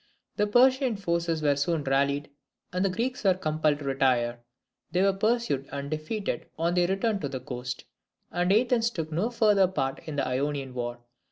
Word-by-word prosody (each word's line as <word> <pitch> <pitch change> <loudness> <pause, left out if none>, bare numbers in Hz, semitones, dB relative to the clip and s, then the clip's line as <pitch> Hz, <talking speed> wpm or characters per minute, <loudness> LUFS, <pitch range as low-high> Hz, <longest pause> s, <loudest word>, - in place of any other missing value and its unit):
The 210 - +1
Persian 255 +2 +4
forces 170 -4 -1
were 145 -1 +3
soon 150 +2 0
rallied, 140 +1 +1 0.4
and 180 +1 +1
the 195 - +2
Greeks 235 +7 -2
were 190 -2 +4
compelled 155 -4 +1
to 145 - -8
retire. 125 -3 +1 0.5
They 180 +1 +2
were 195 0 +4
pursued, 215 - 0
and 140 +1 -5
defeated 155 +7 -3
on 170 +2 +1
their 175 -1 +3
return 195 +3 0
to 140 - -3
the 130 -1 -4
coast, 125 0 -6 0.5
and 175 +1 +1
Athens 235 +2 +3
took 160 -8 -5
no 180 +9 0
further 210 -5 +4
part 135 -7 -2
in 155 - -4
the 140 - 0
Ionian 135 +1 -2
war. 120 -1 -4
165 Hz, 180 wpm, -27 LUFS, 140-200 Hz, 0.5 s, Persian